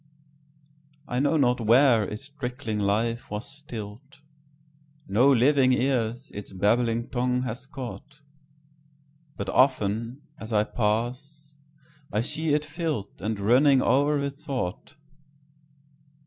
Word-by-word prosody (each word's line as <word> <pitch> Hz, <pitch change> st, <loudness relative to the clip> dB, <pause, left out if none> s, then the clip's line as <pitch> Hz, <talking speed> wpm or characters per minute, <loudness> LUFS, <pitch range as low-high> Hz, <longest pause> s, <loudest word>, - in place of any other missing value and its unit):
I 125 Hz, -, -1 dB
know 145 Hz, +4 st, +2 dB
not 125 Hz, -4 st, +2 dB
where 115 Hz, 0 st, +5 dB
its 105 Hz, +7 st, -7 dB
trickling 125 Hz, -6 st, -4 dB
life 110 Hz, +4 st, 0 dB
was 105 Hz, +2 st, -5 dB
still'd; 125 Hz, -1 st, -9 dB, 0.9 s
No 120 Hz, +8 st, +4 dB
living 130 Hz, +1 st, +4 dB
ears 125 Hz, 0 st, -1 dB
its 105 Hz, -1 st, -8 dB
babbling 115 Hz, +4 st, +1 dB
tongue 125 Hz, 0 st, 0 dB
has 125 Hz, +1 st, -6 dB
caught; 145 Hz, +2 st, -9 dB, 1.2 s
But 100 Hz, -1 st, -4 dB
often, 115 Hz, +1 st, +1 dB, 0.2 s
as 110 Hz, -, -8 dB
I 105 Hz, -1 st, +3 dB
pass, 125 Hz, +8 st, -3 dB, 0.6 s
I 105 Hz, -, +1 dB
see 155 Hz, +5 st, 0 dB
it 150 Hz, -, 0 dB
fill'dAnd 145 Hz, -, -4 dB
running 130 Hz, +6 st, +4 dB
o'er 145 Hz, +4 st, +3 dB
with 140 Hz, 0 st, -3 dB
thought. 130 Hz, -3 st, -5 dB
125 Hz, 110 wpm, -26 LUFS, 110-140 Hz, 1.2 s, where